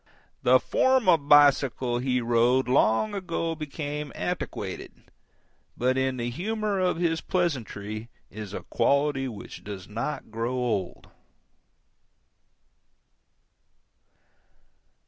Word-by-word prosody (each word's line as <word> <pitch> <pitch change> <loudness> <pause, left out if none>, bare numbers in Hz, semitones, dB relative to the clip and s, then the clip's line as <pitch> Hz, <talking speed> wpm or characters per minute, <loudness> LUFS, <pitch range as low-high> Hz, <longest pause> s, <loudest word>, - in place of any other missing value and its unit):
The 130 +1 +5
form 260 - +2
of 155 -5 +4
bicycle 135 -4 +4
he 125 0 0
rode 120 +2 +2
long 125 - +3
ago 170 -4 -2
became 150 -1 -5
antiquated, 180 0 -4 0.9
but 130 +2 +1
in 130 -1 0
the 120 0 -2
humor 210 - -2
of 180 -2 +1
his 165 -2 0
pleasantry 115 - -2 0.2
is 105 -2 -7
a - - -6
quality 140 -1 +1
which 110 -5 -9
does 100 -3 -8
not 115 +4 -4
grow 115 +3 -2
old. 115 -8 -2
130 Hz, 100 wpm, -26 LUFS, 120-165 Hz, 0.9 s, The